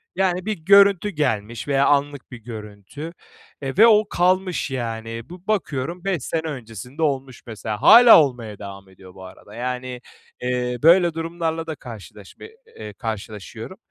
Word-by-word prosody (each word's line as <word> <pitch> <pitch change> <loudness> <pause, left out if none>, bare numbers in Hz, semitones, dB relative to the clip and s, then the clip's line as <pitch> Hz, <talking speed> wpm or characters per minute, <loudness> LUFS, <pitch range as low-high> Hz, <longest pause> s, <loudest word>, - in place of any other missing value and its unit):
Yani, 185 -1 0
bir 215 -1 -2
görüntü 200 +3 +5
gelmiş 120 - -2
veya 140 -1 +2
anlık 145 -2 0
bir 120 - -8
görüntü. 110 - -9 0.5
Eee, 135 +3 -5
ve 225 +3 +8
o 215 -1 +4
kalmış 185 -3 0
yani. 115 -1 -5
Bu 180 +2 -13
bakıyorum 170 -4 -2
5 185 -9 -1
sene 160 - -2
öncesinde 125 - -8
olmuş 135 -4 -2
mesela. 110 -1 -6
Hâlâ 235 -4 +9
olmaya 120 -7 -5
devam 100 -1 -10
ediyor 95 -1 -16
bu 95 - -13
arada. 100 +2 -14
Yani, 125 +1 -5 0.4
eee, 125 0 -2
böyle 170 +1 +5
durumlarla 165 0 -3
da 160 - -4
karşılaşma 105 -6 -12 0.3
eee, 105 -1 -9
karşılaşıyorum 110 - -7
135 Hz, 145 wpm, -22 LUFS, 115-170 Hz, 0.5 s, Hâlâ